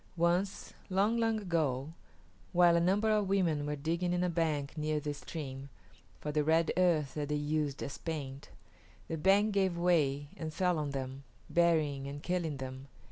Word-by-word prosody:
Once, 175 +4 0 0.2
long, 200 +5 +2
long 225 -1 +1
ago, 155 -6 -1 0.6
while 175 -1 +6
a - - +4
number 200 +5 +2
of 210 -2 +2
women 165 -7 +1
were 150 - -1
digging 170 +5 -1
in 180 0 +1
a 180 - +1
bank 155 -4 -1
near 155 0 0
this 145 0 -4
stream 135 -3 -6 0.5
for 150 - -3
the 150 0 +1
red 160 +2 +3
earth 165 -6 +2
that 150 -1 -3
they 150 - +1
used 150 -1 -1
as 140 - -6
paint, 140 -4 -5 0.6
the 165 - -3
bank 195 +6 +4
gave 190 -3 +1
way 150 -5 +2
and 155 -1 -6
fell 180 -3 +2
on 150 -1 -2
them, 135 0 -5 0.3
burying 155 -5 +2
and 145 +1 -7
killing 170 -5 -1
them. 130 0 -7
160 Hz, 175 wpm, -32 LUFS, 145-180 Hz, 0.6 s, while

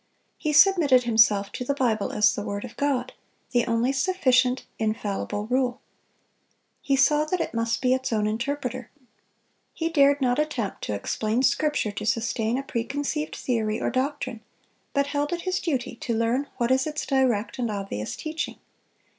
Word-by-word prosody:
He 305 - -1
submitted 300 -6 +5
himself 220 -4 +4
to 250 - -4
the 280 +3 -1
Bible 225 -7 0
as 210 0 +4
the - - -4
word 205 +1 -4
of 240 - -11
God, 265 -3 -1 0.4
the 240 -1 +2
only 235 +3 +1
sufficient, 265 -5 +2
infallible 210 -1 -2
rule. 250 +1 0 1.0
He 275 - +1
saw 295 +3 +4
that 360 +4 -1
it 330 - -2
must 230 +1 -1
be 255 0 +4
its 260 -1 -1
own 215 -2 +1
interpreter. 255 +3 -3 0.9
He 330 0 -1
dared 285 -3 +4
not 250 0 +1
attempt 275 -10 -2
to 105 - -2
explain 215 - -1
Scripture 295 -6 +1
to 205 +1 -6
sustain 230 +1 0
a 275 - -3
preconceived 285 +5 -3
theory 220 -3 -1
or - - -1
doctrine, 255 -3 -2 0.5
but 280 -1 +1
held 290 +2 -1
it 345 - -2
his 370 +1 -1
duty 265 -8 -2
to 235 - -2
learn 240 +5 0
what 240 +1 0
is 265 +2 +2
its 300 -1 -3
direct 255 -4 +1
and 240 -2 0
obvious 195 - -4
teaching. 315 0 -4
255 Hz, 165 wpm, -25 LUFS, 225-285 Hz, 1.0 s, submitted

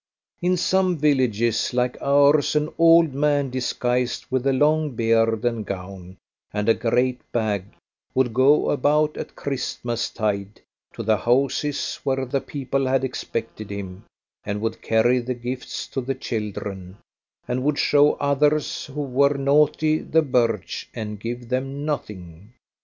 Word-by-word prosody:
In 180 +1 +2
some 185 0 +1
villages 125 -6 +1
like 125 0 +1
ours 145 +1 +4
an 150 0 +1
old 165 -2 +6
man 145 -1 +1
disguised 125 -1 -1
with 130 +1 0
a - - +4
long 150 +1 +2
beard 115 0 +2
and 115 -2 0
gown, 95 -1 -8 0.3
and 105 0 -2
a 115 - +6
great 125 +2 0
bag, 105 -5 -1 0.5
would 130 -3 +2
go 135 +5 +4
about 150 +2 +2
at - - -7
Christmastide 115 -6 -3 0.4
to - - -5
the 110 0 +2
houses 135 +5 0
where 135 -1 0
the 135 +2 -1
people 135 -1 -2
had 135 0 +1
expected 115 -4 -5
him, 95 -2 -7 0.4
and 105 0 -3
would 110 +1 -3
carry 120 +3 +3
the 125 +1 -3
gifts 125 +1 -5
to 135 - -3
the 135 +2 -3
children, 100 -6 -5 0.5
and 125 +1 -1
would 150 +1 +1
show 145 0 +4
others 145 +1 0
who 145 +1 -4
were 140 +2 +2
naughty 150 +2 +3
the 160 0 +1
birch, 120 -7 -1
and 105 -2 -5
give 120 +2 -5
them 135 +3 -2
nothing. 100 - -6
125 Hz, 140 wpm, -23 LUFS, 115-145 Hz, 0.5 s, old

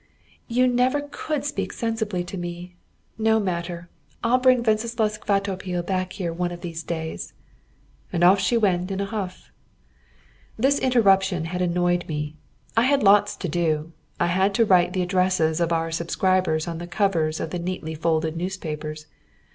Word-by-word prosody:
"You 250 +2 +3
never 250 +3 +2
could 305 -2 -3
speak 290 - -2
sensibly 220 -6 -2
to 175 - -7
me. 175 0 -6 0.4
No 220 0 +3
matter! 175 -3 -3 0.4
I'll 240 +2 +3
bring 255 -1 +4
Wenceslaus 220 -1 0
Kvatopil 190 -3 -1
back 185 -1 -2
here 175 -4 -3
one 175 +1 -2
of 175 0 -8
these 165 -2 -5
days." 160 -1 -5 0.8
And 175 - 0
off 190 +3 +6
she 195 +5 +2
went 185 -4 +1
in 195 0 -3
a 200 - 0
huff. 195 -3 -6 1.1
This 270 +5 +3
interruption 195 -9 +3
had 180 +2 -3
annoyed 175 0 +1
me. 150 -1 -4 0.4
I 225 - +5
had 275 +3 +3
lots 205 +1 +5
to 185 - -4
do. 160 -1 0 0.3
I - - +3
had 190 +3 +1
to 230 - +4
write 180 -3 +4
the 185 -2 0
addresses 180 -3 +1
of 170 0 +1
our 165 0 0
subscribers 170 0 +1
on 165 -1 -4
the 175 - -6
covers 165 -4 0
of 160 - -4
the 180 - -3
neatly 170 -2 -4
folded 160 0 0
newspapers. 155 -4 -5
180 Hz, 165 wpm, -24 LUFS, 170-210 Hz, 1.1 s, off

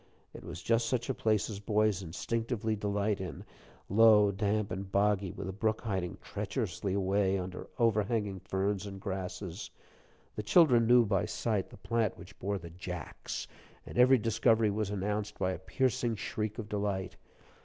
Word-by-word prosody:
It - - -10
was - - -8
just 115 0 +2
such 125 +1 0
a - - -1
place 110 -4 +1
as 105 -3 -6
boys 105 -1 +1
instinctively 110 +5 -2
delight 100 0 -1
in 90 -7 -6 0.4
low, 105 -1 +6
damp, 105 +1 0
and 95 +1 -5
boggy, 100 -2 +2
with - - -6
a - - -2
brook 110 +2 0
hiding 95 -6 -2
treacherously 95 -2 -3
away 95 0 +2
under 90 0 -5
overhanging 105 -3 +1
ferns 95 +2 -1
and 95 -1 -7
grasses. 95 -1 -5 0.7
The - - -2
children 120 - +5
knew 120 0 +6
by 100 -3 +1
sight 105 -5 -1
the - - -13
plant 115 +1 0
which 90 - -13
bore 100 +1 -1
the 85 -2 -9
"Jacks," 90 0 -6 0.4
and - - -9
every 130 +1 +7
discovery 115 -1 +3
was 105 0 -1
announced 105 +1 -2
by 95 - 0
a 90 - -4
piercing 115 +4 0
shriek 105 0 -3
of 110 - -5
delight. 100 -3 -2
105 Hz, 165 wpm, -31 LUFS, 95-110 Hz, 0.7 s, every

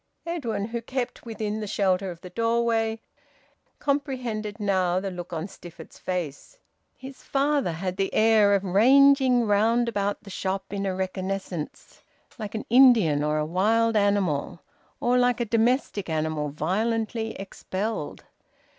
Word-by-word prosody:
Edwin, 240 -11 -3
who 235 0 -3
kept 245 0 -4
within 215 -1 -3
the 210 - -4
shelter 195 -2 0
of 170 -1 -9
the 180 - -10
doorway, 230 +1 0 0.8
comprehended 250 -7 -2
now 185 -3 +1
the 195 0 -4
look 180 0 -7
on 165 -1 -3
Stifford's 170 -4 -13
face. 180 - -5 0.4
His 265 0 -11
father 280 - 0
had 180 +3 -4
the 195 -1 0
air 215 -2 +4
of 195 - 0
ranging 255 +5 +5
round 225 +3 +2
about 205 -2 -2
the 200 - -11
shop 190 +1 -3
in 200 0 -2
a 190 - -1
reconnaissance, 185 -3 -5 0.4
like 215 0 -5
an 220 - -4
Indian 225 - +5
or 150 0 0
a 150 - 0
wild 220 +7 +2
animal, 200 -7 +1 0.4
or 245 +1 +2
like 245 -1 +2
a 240 - 0
domestic 230 -3 0
animal 155 -1 -1
violently 220 - -1
expelled. 195 -2 -5
205 Hz, 140 wpm, -25 LUFS, 185-235 Hz, 0.8 s, ranging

